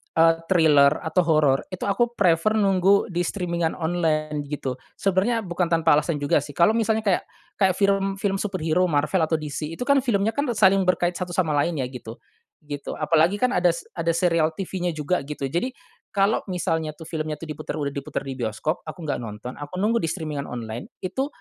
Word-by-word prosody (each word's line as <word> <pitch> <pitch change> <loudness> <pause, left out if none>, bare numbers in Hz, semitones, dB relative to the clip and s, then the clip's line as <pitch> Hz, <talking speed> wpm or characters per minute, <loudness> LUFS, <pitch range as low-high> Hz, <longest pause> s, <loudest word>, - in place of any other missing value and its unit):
eee, 165 0 +5
thriller 155 -5 +4
atau 160 +3 0
horor. 150 -4 +3
Itu 185 -1 -7
aku 240 +4 0
prefer 180 +3 +3
nunggu 195 -1 +3
di 175 +1 0
streaming-an 170 -4 -1
online, 155 -3 -1
gitu. 135 -3 -4 0.2
Sebenarnya 200 +4 +1
bukan 175 -1 -1
tanpa 165 -3 +4
alasan 155 +1 -2
juga 145 +1 +2
sih. 145 0 -9
Kalau 170 +5 +5
misalnya 220 -1 +1
kayak 195 -4 +1 0.4
kayak 190 -3 +3
film-film 195 0 +1
superhero, 180 -3 0
Marvel 150 +4 +1
atau 160 - +1
DC. 155 +1 -4
Itu 250 - -4
kan 280 +1 +4
filmnya 220 -4 +1
kan, 285 +4 -2
saling 195 -2 +5
berkaitan 180 0 +1
satu 175 - -6
sama 170 -5 +1
lainnya, 145 -1 +1
gitu. 115 -3 -8 0.5
Gitu. 145 -1 -6
Apalagi 165 +4 +2
kan, 250 +4 +1
ada 180 0 +3
s 170 - -7
ada 170 0 -1
serial 165 -2 +2
TV-nya 180 -2 -3
juga, 155 +4 0
gitu. 150 -1 -6
Jadi, 175 - -2 0.4
kalau 200 +3 +3
misalnya 165 -4 -2
tuh 160 - -11
filmnya 155 -1 -3
tuh 155 - -9
diputar 150 - -5
udah 145 -2 -2
diputar 140 0 -4
di 135 -1 -5
bioskop. 120 - -2
Aku 175 - -7
enggak 145 -5 -2
nonton, 115 +2 -7
aku 145 +4 -7
nunggu 215 +5 +1
di 165 - -1
streaming 155 -3 -4
online 115 -1 -6 0.2
itu, 265 +9 -1
170 Hz, 190 wpm, -24 LUFS, 150-195 Hz, 0.5 s, eee